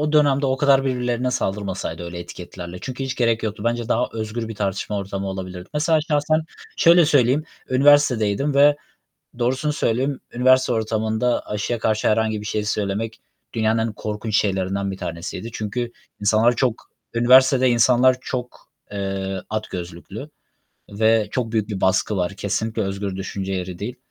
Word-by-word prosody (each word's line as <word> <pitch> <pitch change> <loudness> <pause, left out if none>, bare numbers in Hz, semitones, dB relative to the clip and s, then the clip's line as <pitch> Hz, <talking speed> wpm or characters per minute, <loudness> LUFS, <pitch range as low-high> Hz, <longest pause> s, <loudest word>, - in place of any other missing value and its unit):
o 150 0 0
dönemde 145 -2 +4
o 130 - +1
kadar 135 -1 +4
birbirlerine 125 -1 0
saldırmasaydı 95 -6 -3
öyle 85 0 -6
etiketlerle 85 0 -8
çünkü 130 +1 -5
hiç 135 0 -3
gerek 115 -2 +1
yoktu. 105 0 -4
Bence 120 -1 -1
daha 120 +2 +1
özgür 110 +1 -4
bir 115 - -6
tartışma 100 +1 -2
ortamı 100 0 -4
olabilirdi. 95 -1 -6
Mesela 155 +1 +2
şahsen 155 0 +1 0.4
şöyle 170 0 +6
söyleyeyim; 145 0 +3 0.3
üniversitedeydim 135 -2 +4
ve 145 +1 +6 0.6
doğrusunu 130 +5 0
söyleyeyim, 130 0 0
üniversite 130 +1 +4
ortamında 110 +1 0
aşıya 105 +3 -2
karşı 110 -1 +1
herhangi 110 0 +1
bir 105 - -8
şey 105 0 -1
söylemek 105 +1 -2 0.3
dünyanın 110 0 +1
en - - -5
korkunç 105 0 -3
şeylerinden 95 -1 0
bir 95 - -5
tanesiydi 85 +6 -5
çünkü 120 +2 -3 0.3
insanlar 110 +4 +3
çok, 125 -4 -1 0.2
üniversitede 130 +2 +5
insanlar 125 +2 +4
çok, 125 -1 -6 0.2
eee, 95 -1 -3
at 110 0 -3
gözlüklü 90 - -7 0.6
ve 110 +1 +2
çok 120 -3 -2
büyük 110 -2 0
bir 100 -3 -4
baskı 95 +2 +2
var. 90 +1 -1
Kesinlikle 110 +3 -2
özgür 100 0 -3
düşünce 95 0 -4
yeri 90 -1 -4
değil. 120 +5 -4
110 Hz, 150 wpm, -22 LUFS, 100-130 Hz, 0.6 s, şöyle